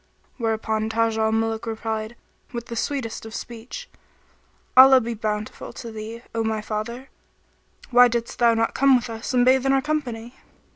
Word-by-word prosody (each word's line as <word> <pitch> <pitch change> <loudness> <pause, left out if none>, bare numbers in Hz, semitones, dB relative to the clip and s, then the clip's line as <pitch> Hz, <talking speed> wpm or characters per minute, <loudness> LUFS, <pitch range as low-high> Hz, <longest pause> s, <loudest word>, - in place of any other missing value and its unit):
"[FN#19] - - -39
Where 225 -1 +1
upon 220 0 -2
Taj 225 0 +1
al 220 0 +2
Muluk 225 0 -1
replied, 220 0 -4 0.4
with 235 -1 -5
the 235 - -7
sweetest 240 -2 -3
of 225 0 -8
speech, 245 - -8 0.9
"Allah 265 0 +9
be 235 -1 -3
bountiful 210 -1 -4
to 235 -2 -8
thee, 220 +2 -8
O 225 0 0
my 220 -1 -1
father; 230 +5 -5 0.8
why 245 0 +8
didst 235 -1 -3
thou 235 -1 +5
not 225 0 0
come 275 -1 +5
with 245 -1 -1
us 225 +1 -5
and 245 0 +4
bathe 260 0 +4
in 270 0 +2
our 270 - +4
company?" 255 -6 -3
230 Hz, 180 wpm, -23 LUFS, 220-245 Hz, 0.9 s, Allah